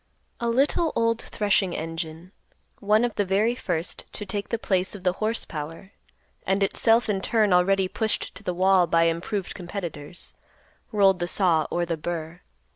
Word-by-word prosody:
A 235 - -1
little 290 +7 +2
old 230 0 +1
threshing 200 -4 0
engine, 165 +2 -5 0.5
one 215 +3 +3
of 240 - -2
the 205 - +1
very 200 +5 +2
first 175 -8 -3
to 210 - -6
take 200 +1 -3
the 230 - 0
place 190 -3 0
of 190 - -10
the 180 -1 +2
horse 220 +2 0
power, 165 +5 -7 0.5
and 195 +1 +1
itself 225 +4 +3
in 200 -3 0
turn 215 -2 +2
already 190 +1 +3
pushed 220 +3 -2
to - - -10
the 180 - -3
wall 185 -1 +4
by 165 +1 +3
improved 170 +4 -1
competitors, 175 -4 -6 0.6
rolled 195 -4 +4
the 175 - -1
saw 175 -4 +2
or 175 0 0
the 165 -1 -2
burr. 170 +1 -5
190 Hz, 170 wpm, -25 LUFS, 175-210 Hz, 0.6 s, wall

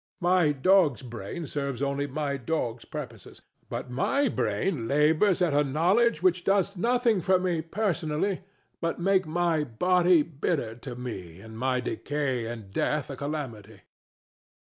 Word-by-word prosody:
My 175 -3 +4
dog's 150 -1 +3
brain 120 - -6
serves 140 -3 -3
only 140 +1 -1
my 145 0 -2
dog's 125 -4 -3
purposes; - - -9 0.3
but 125 - -5
my 270 - +1
brain 155 - -1
labors 155 - +3
at 165 -5 +1
a 145 +1 +4
knowledge 175 - +2
which 180 -1 +3
does 195 0 +2
nothing 235 0 +2
for 185 +2 +3
me 180 -3 0
personally 175 0 -1 0.4
but 165 -1 -1
make 190 0 +2
my 165 -1 +1
body 175 +6 +3
bitter 145 -6 -2
to 120 +1 -8
me 95 -9 -7
and 110 +2 -11
my 125 +2 0
decay 130 -2 -2
and 115 -4 -7
death 150 +5 -1
a - - -5
calamity. 120 -9 -6
150 Hz, 145 wpm, -27 LUFS, 130-180 Hz, 0.4 s, My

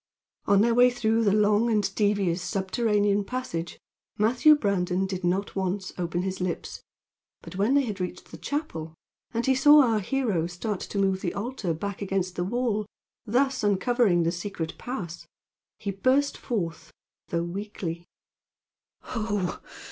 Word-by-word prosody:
On 200 0 +5
their 230 +2 +3
way 245 +1 +6
through 225 -2 +1
the 205 - +3
long 210 +2 +3
and 205 -3 +1
devious 200 -4 +1
subterranean 205 +2 +1
passage 195 -8 -4 0.4
Matthew 240 +8 +5
Brandon 190 -6 0
did 190 -1 -4
not 185 +3 0
once 190 0 -2
open 175 0 -2
his 190 -1 -3
lips; 180 -2 -4 0.6
but 165 - -10
when 210 +8 +2
they 285 - +4
had 210 -6 -4
reached 180 0 -5
the - - -8
chapel, 165 - -4 0.4
and 230 0 -1
he 265 - +4
saw 290 +2 +7
our 225 -4 +2
hero 205 -6 0
start 180 +3 -4
to - - -6
move 190 -1 +1
the 175 - -2
altar 210 -3 -3
back 200 +5 -5
against 190 -2 -1
the 175 - -1
wall, 215 0 -1 0.4
thus 265 +3 +1
uncovering 205 -2 +3
the 165 - +1
secret 175 -2 -5
pass, 175 -9 -6 0.5
he 200 - -3
burst 260 +8 +2
forth, 170 - -4 0.4
though 170 0 -1
weakly: 175 -2 -5 1.1
"Oho! 205 -5 -2
200 Hz, 150 wpm, -26 LUFS, 180-230 Hz, 1.1 s, saw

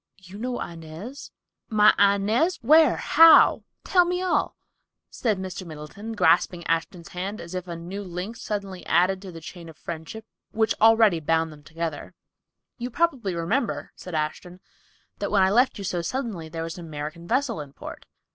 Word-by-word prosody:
"You 190 +1 -12
know 245 +1 -3
Inez, 170 - -8 0.4
my 215 -2 +6
Inez—where—how—tell 295 - +4
me 360 +1 -1
all," 370 - 0 0.6
said 220 -5 -1
Mr. 185 0 -6
Middleton, 170 +7 -8
grasping 175 -3 +2
Ashton's 165 +1 -2
hand 195 +4 -5
as 170 +1 -9
if 185 0 -5
a 170 - -5
new 180 +5 -6
link 180 +4 -6
suddenly 200 -4 -5
added 185 +3 +2
to 190 -2 -9
the 165 - -9
chain 170 +1 -10
of 160 - -14
friendship 170 +7 -7 0.3
which 220 0 +2
already 220 -5 +5
bound 160 +1 0
them 150 - -15
together. 165 +2 -6 0.6
"You 245 +1 -4
probably 250 - 0
remember," 155 -3 -2
said 180 -3 -8
Ashton, 155 +4 -4 0.6
"that - - -2
when 200 -2 +3
I 190 - +3
left 245 +5 +3
you 200 - -6
so 180 -2 -2
suddenly 200 -5 -4
there 165 0 -5
was 165 +2 -6
an 170 - -8
American 155 +3 -7
vessel 245 - 0
in 145 -2 -10
port. - - -10
185 Hz, 160 wpm, -25 LUFS, 165-220 Hz, 0.6 s, my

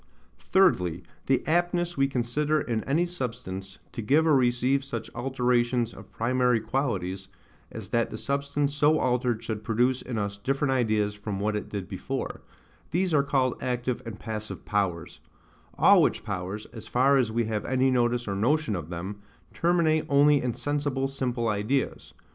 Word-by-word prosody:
Thirdly, 90 - +2 0.2
the 135 -1 +2
aptness 175 +1 +1
we 135 0 +3
consider 140 +4 0
in 115 -6 -2
any 155 +6 +2
substance, 100 - -6
to - - -5
give 145 +9 +3
or 155 -3 +5
receive 125 +2 +2
such 115 -4 -6
alterations 120 -1 0
of - - -13
primary 125 0 +2
qualities, 110 -6 -2 0.4
as - - -8
that 115 -1 +1
the - - -6
substance 140 +2 -1
so 150 +2 +4
altered 125 -4 0
should 110 -2 -4
produce 125 +3 +1
in 125 -3 -5
us 100 -1 -2
different 135 +6 0
ideas 110 -5 +1
from 105 -1 -5
what 105 +1 0
it 105 - -4
did 100 -3 -5
before; - - -4 0.5
these 180 +1 0
are 145 - +5
called 135 -3 0
active 125 0 -2
and 115 -3 -8
passive 110 -1 -6
powers: 95 -5 -2 0.6
all - - +7
which - - +1
powers, 95 +4 -4
as 110 -2 -8
far 135 +3 +3
as 120 -4 +1
we 115 +1 +1
have 110 -1 -2
any 130 0 +2
notice 120 -1 +1
or 100 - -1
notion 120 +2 +1
of 85 -3 -5
them, 95 +4 -6 0.3
terminate 165 -2 +2
only 145 0 +5
in 125 -2 -2
sensible 145 -1 -1
simple 125 -3 -2
ideas. 110 +6 -1
125 Hz, 165 wpm, -27 LUFS, 110-140 Hz, 0.6 s, all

